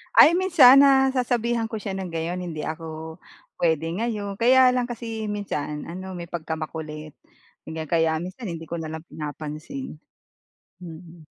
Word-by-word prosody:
Ay 340 Hz, -, +8 dB
minsan 295 Hz, -8 st, +7 dB
nasasabihan 250 Hz, -4 st, +2 dB
ko 220 Hz, -, -3 dB
siya 200 Hz, -2 st, -5 dB
ng 190 Hz, -2 st, -5 dB
gayon, 170 Hz, +2 st, -3 dB
"Hindi 160 Hz, -3 st, -5 dB
ako 160 Hz, 0 st, -6 dB, 0.4 s
puwede 160 Hz, -2 st, +1 dB
ngayon." 210 Hz, -2 st, -3 dB
Kaya 255 Hz, +3 st, +5 dB
lang 250 Hz, -, +1 dB
kasi 230 Hz, -2 st, -5 dB
minsan 150 Hz, -8 st, -4 dB
ano 185 Hz, +2 st, -7 dB
may 175 Hz, -2 st, -7 dB
pagkamakulit 155 Hz, -2 st, -6 dB, 0.5 s
ganyan 160 Hz, 0 st, -6 dB
kaya 160 Hz, 0 st, +2 dB
minsan 185 Hz, +5 st, -6 dB
hindi 165 Hz, -1 st, -7 dB
ko -, -, -4 dB
na 165 Hz, -2 st, -5 dB
lang 160 Hz, +1 st, -7 dB
pinapansin. 155 Hz, -, -7 dB, 0.8 s
Mm. 170 Hz, -2 st, -12 dB
175 Hz, 140 wpm, -24 LUFS, 160-235 Hz, 0.8 s, Ay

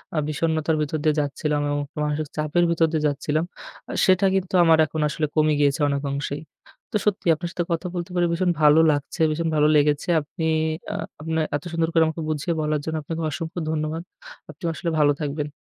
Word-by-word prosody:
আ -, -, -1 dB
বিষন্নতার 160 Hz, +1 st, 0 dB
ভিতর 150 Hz, +1 st, -1 dB
দিয়ে 155 Hz, -1 st, +3 dB
যাচ্ছিলাম 145 Hz, +1 st, -1 dB
এবং 145 Hz, 0 st, 0 dB, 0.2 s
মানসিক 150 Hz, +1 st, -1 dB
চাপের 155 Hz, +3 st, +1 dB
ভিতর 165 Hz, -1 st, +3 dB
দিয়ে 155 Hz, -1 st, 0 dB
যাচ্ছিলাম, 150 Hz, +2 st, -1 dB, 0.5 s
আ -, -, -4 dB
সেটা 185 Hz, +1 st, +4 dB
কিন্তু 190 Hz, -1 st, -2 dB
আমার 165 Hz, -1 st, +6 dB
এখন 155 Hz, +1 st, -4 dB
আসলে 155 Hz, -, -1 dB
কমে 155 Hz, 0 st, +3 dB
গিয়েছে, 140 Hz, 0 st, +2 dB
অনেক 140 Hz, 0 st, -1 dB
অংশেই। 140 Hz, +1 st, -3 dB, 0.5 s
তো -, -, -5 dB
সত্যিই, 205 Hz, -4 st, +2 dB
আপনার 170 Hz, +2 st, -5 dB
সাথে 175 Hz, -, -2 dB
কথা 170 Hz, +2 st, -1 dB
বলতে 175 Hz, +1 st, -4 dB
পেরে 175 Hz, -1 st, +3 dB
ভীষণ 175 Hz, +1 st, +1 dB
ভালো 150 Hz, +1 st, +6 dB
লাগছে, 145 Hz, +3 st, -3 dB
ভীষণ 165 Hz, +2 st, -1 dB
ভালো 150 Hz, 0 st, +4 dB
লেগেছে। 150 Hz, +2 st, +2 dB
আপনি 160 Hz, +3 st, -5 dB, 0.5 s
আ -, -, -4 dB, 0.3 s
আপনার 160 Hz, 0 st, -1 dB
এত 145 Hz, -, -3 dB
সুন্দর 165 Hz, -1 st, 0 dB
করে 165 Hz, -, +5 dB
আমাকে 160 Hz, +1 st, -4 dB
বুঝিয়ে 155 Hz, +2 st, -1 dB
বলার 150 Hz, 0 st, 0 dB
জন্য, 160 Hz, -, -2 dB
আপনাকে 165 Hz, +3 st, -4 dB
অসংখ্য 160 Hz, +3 st, -5 dB
ধন্যবাদ। 155 Hz, +1 st, -2 dB, 0.5 s
আপনিও 165 Hz, +3 st, -4 dB
আসলে 170 Hz, -, -3 dB
ভালো 145 Hz, -1 st, +5 dB
থাকবেন। 150 Hz, 0 st, -3 dB
155 Hz, 195 wpm, -23 LUFS, 150-165 Hz, 0.5 s, আমার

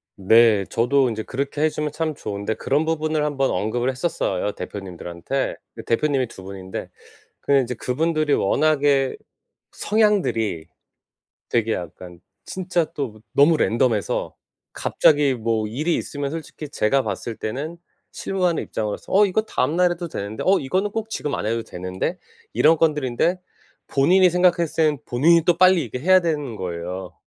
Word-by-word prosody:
네. 110 Hz, +1 st, +5 dB
저도 130 Hz, +2 st, +2 dB
인제 110 Hz, -1 st, -4 dB
그렇게 140 Hz, +3 st, -3 dB
해 155 Hz, -, +4 dB
주면 150 Hz, -1 st, -3 dB
참 155 Hz, +1 st, -2 dB
좋은데 100 Hz, -4 st, -4 dB
그런 145 Hz, +7 st, 0 dB
부분을 155 Hz, -1 st, 0 dB
한번 135 Hz, -2 st, 0 dB
언급을 120 Hz, +6 st, -1 dB
했었어요 125 Hz, -, -1 dB
대표님들한테. 95 Hz, +6 st, -5 dB, 0.2 s
그 -, -, -8 dB
대표님이 135 Hz, +1 st, +1 dB
2 95 Hz, -, -12 dB
분인데 95 Hz, -1 st, -7 dB, 0.5 s
그 -, -, -1 dB
인제 125 Hz, -1 st, -1 dB
그분들이 155 Hz, +5 st, 0 dB
워낙에 140 Hz, +2 st, +2 dB, 0.6 s
성향들이 190 Hz, -, +1 dB, 0.8 s
되게 115 Hz, -1 st, +1 dB
약간 90 Hz, 0 st, -8 dB, 0.3 s
진짜 180 Hz, -2 st, -1 dB
또 120 Hz, -7 st, -5 dB
너무 150 Hz, +3 st, +5 dB
랜덤해서 115 Hz, -5 st, 0 dB, 0.4 s
갑자기 145 Hz, -3 st, +3 dB
뭐 110 Hz, -2 st, -1 dB
일이 155 Hz, +10 st, -1 dB
있으면 145 Hz, -1 st, -4 dB
솔직히 155 Hz, -2 st, -7 dB
제가 135 Hz, 0 st, +1 dB
봤을 115 Hz, -, -4 dB
때는 145 Hz, +12 st, -5 dB, 0.3 s
실무 190 Hz, -2 st, -2 dB
하는 170 Hz, -2 st, +1 dB
입장으로서 105 Hz, -2 st, -5 dB
"어 205 Hz, +2 st, +6 dB
이거 200 Hz, +2 st, +1 dB
다음 160 Hz, -8 st, -1 dB
날 180 Hz, 0 st, +3 dB
해도 175 Hz, 0 st, -4 dB
되는데. 105 Hz, -7 st, -5 dB
어 195 Hz, +1 st, +5 dB
이거는 185 Hz, +10 st, -1 dB
꼭 220 Hz, +1 st, -4 dB
지금 150 Hz, -9 st, -3 dB
안 -, -, -4 dB
해도 115 Hz, +1 st, -1 dB
되는데." 95 Hz, -, -4 dB, 0.4 s
이런 160 Hz, +1 st, +4 dB
건들인데 150 Hz, +3 st, +1 dB, 0.5 s
본인이 180 Hz, +7 st, +4 dB
생각했을 175 Hz, -2 st, +2 dB
때는 150 Hz, -3 st, +1 dB
본인이 160 Hz, +7 st, +4 dB
또 175 Hz, -2 st, +3 dB
빨리 185 Hz, -1 st, +5 dB
이렇게 125 Hz, +1 st, -6 dB
해야 185 Hz, +5 st, +5 dB
되는 150 Hz, -8 st, -2 dB
거예요. 90 Hz, 0 st, -5 dB
140 Hz, 335 characters per minute, -22 LUFS, 110-165 Hz, 0.8 s, 어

